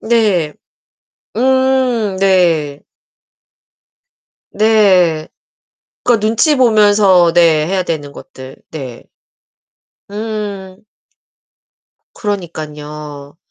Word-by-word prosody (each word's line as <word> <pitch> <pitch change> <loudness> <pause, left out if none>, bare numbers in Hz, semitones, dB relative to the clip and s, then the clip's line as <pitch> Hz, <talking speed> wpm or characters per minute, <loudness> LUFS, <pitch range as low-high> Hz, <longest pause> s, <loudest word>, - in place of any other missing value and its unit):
네. 210 -9 +1 0.8
음 255 -4 +1
네. 170 -7 +1 1.7
네. 190 -7 +2 0.8
그니까 240 -3 +2
눈치 225 +8 +2
보면서 205 -7 +4
네 165 -3 +3
해야 185 +2 -1
되는 150 -5 -5
것들 130 -1 -12
네. 130 -7 -8 1.1
음. 205 -3 -6 1.3
그러니깐요. 150 -6 -7
190 Hz, 115 characters per minute, -15 LUFS, 155-215 Hz, 1.7 s, 보면서